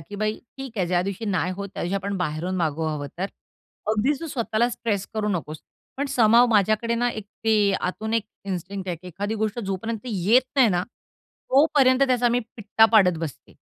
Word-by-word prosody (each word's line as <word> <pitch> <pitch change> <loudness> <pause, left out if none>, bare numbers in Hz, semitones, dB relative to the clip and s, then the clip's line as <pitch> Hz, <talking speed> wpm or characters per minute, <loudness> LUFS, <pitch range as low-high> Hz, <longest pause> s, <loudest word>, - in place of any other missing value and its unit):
की 180 +7 -11
"बाई 215 +1 -1 0.2
ठीक 270 -3 -7
आहे, 185 - +1
ज्यादिवशी 185 +4 -1
नाही 180 -3 0
होत, 200 0 -5
त्या - - -4
दिवशी 175 +3 -2
आपण 200 +1 -3
बाहेरून 180 +1 -2
मागवू 160 -2 -1
हवं 150 -2 -3
तर. 190 - 0 0.6
अगदी 220 +6 +2
तू 330 - -4
स्वतःला 235 -4 0
स्ट्रेस 215 -4 -2
करू 215 -1 -1
नकोस." 160 -6 -3 0.4
पण 280 +2 -1
समहाऊ 235 -1 +6
माझ्याकडे 220 +2 +2
ना, 240 +1 +1
एक 220 -3 -6 0.2
ते 210 -3 +3
आतून 220 +5 -2
एक 225 -2 +1 0.2
इन्स्टिंक्ट 190 0 -5
आहे, 175 - -2
की 175 +3 -15
एखादी 205 +5 -3
गोष्ट 215 +2 -1
जोपर्यंत 205 +2 -3
येत 220 +3 +3
नाही 255 -5 +6
ना, 175 -2 +1
तोपर्यंत 275 +1 +1
त्याचा 250 -2 +2
मी 240 +1 +1 0.2
पिट्टा 220 0 +3
पाडत 180 -6 +5
बसते. 160 -5 -7
210 Hz, 190 wpm, -24 LUFS, 180-230 Hz, 0.6 s, समहाऊ